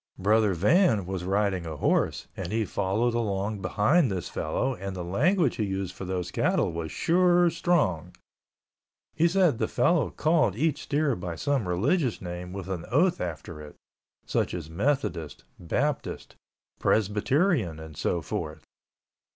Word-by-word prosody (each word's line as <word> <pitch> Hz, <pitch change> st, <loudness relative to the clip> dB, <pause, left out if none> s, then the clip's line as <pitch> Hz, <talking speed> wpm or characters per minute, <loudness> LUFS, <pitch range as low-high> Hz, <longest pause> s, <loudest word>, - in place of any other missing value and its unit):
Brother 105 Hz, 0 st, +3 dB
Van 110 Hz, -, +3 dB
was 95 Hz, -1 st, -4 dB
riding 95 Hz, -3 st, 0 dB
a 80 Hz, -, -5 dB
horse -, -, +1 dB
and 95 Hz, -1 st, -5 dB
he 110 Hz, 0 st, 0 dB
followed 110 Hz, +6 st, 0 dB
along 105 Hz, -2 st, -1 dB
behind 115 Hz, -, +2 dB
this 95 Hz, -3 st, -3 dB
fellow 130 Hz, +12 st, -1 dB
and 95 Hz, -3 st, -6 dB
the 90 Hz, -, -4 dB
language 145 Hz, -, +1 dB
he 110 Hz, -, 0 dB
used 95 Hz, -2 st, -3 dB
for 95 Hz, -, -7 dB
those 90 Hz, -1 st, -3 dB
cattle -, -, +1 dB
was 80 Hz, -1 st, -4 dB
sure 175 Hz, 0 st, +3 dB
strong. 95 Hz, -, 0 dB, 1.0 s
He 165 Hz, +2 st, +3 dB
said 175 Hz, -8 st, +2 dB
the -, -, +1 dB
fellow 155 Hz, +5 st, +2 dB
called 155 Hz, -, +2 dB
each 150 Hz, +4 st, 0 dB
steer 145 Hz, -3 st, 0 dB
by 90 Hz, -3 st, -5 dB
some 135 Hz, +1 st, -1 dB
religious 120 Hz, -, +1 dB
name 90 Hz, 0 st, -6 dB
with 95 Hz, -1 st, -6 dB
an 90 Hz, -3 st, -4 dB
oath 170 Hz, +7 st, +2 dB
after 80 Hz, -2 st, -5 dB
it, 75 Hz, -1 st, -11 dB, 0.5 s
such -, -, -1 dB
as 80 Hz, -3 st, -7 dB
Methodist, 95 Hz, -, -1 dB, 0.2 s
Baptist, 85 Hz, -, -2 dB, 0.4 s
Presbyterian, 110 Hz, -, +1 dB
and 80 Hz, -1 st, -10 dB
so 85 Hz, +2 st, -1 dB
forth. 75 Hz, +2 st, -5 dB
100 Hz, 150 wpm, -27 LUFS, 90-145 Hz, 1.0 s, Brother